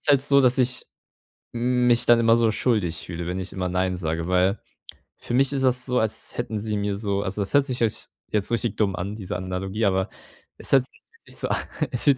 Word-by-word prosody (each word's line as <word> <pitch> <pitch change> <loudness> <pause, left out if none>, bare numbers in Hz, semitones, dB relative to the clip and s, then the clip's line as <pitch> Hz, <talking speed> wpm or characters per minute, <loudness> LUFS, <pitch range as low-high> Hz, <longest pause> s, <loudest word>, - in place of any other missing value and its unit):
Ist - - -14
halt 140 -2 +5
so, 140 0 +5
dass 125 0 +4
ich 125 0 +1 0.7
m 125 +1 +1
mich 120 0 +4
dann 120 -1 +6
immer 115 0 +4
so 115 -1 +3
schuldig 105 -9 0
fühle, 85 -1 -5
wenn 90 +1 -3
ich 95 - -7
immer 90 -2 -2
nein 90 0 0
sage, 80 -1 -2
weil 90 +3 +2 0.6
für - - -6
mich 135 +2 +3
ist 135 - 0
das 125 -1 +2
so, 125 -1 +1
als 110 -1 -2
hätten 110 -3 -2
sie 105 0 -2
mir 100 -1 -1
so 100 -1 -1
also, 100 +2 -3
das 100 - -3
hört 140 -1 +5
sich 125 -2 -2
ja 115 - +5
j - - -4 0.4
jetzt 105 +1 0
richtig 115 0 -1
dumm 100 -4 +1
an, 100 +5 -4
diese 95 -4 -5
Analogie, 95 +4 -2
aber 95 -1 +1 0.5
es - - -6
hört 135 -2 +5
sich - - -12
so - - -2 0.4
es 125 - 0
fühlt 140 -3 +5
110 Hz, 230 wpm, -24 LUFS, 95-125 Hz, 0.7 s, dann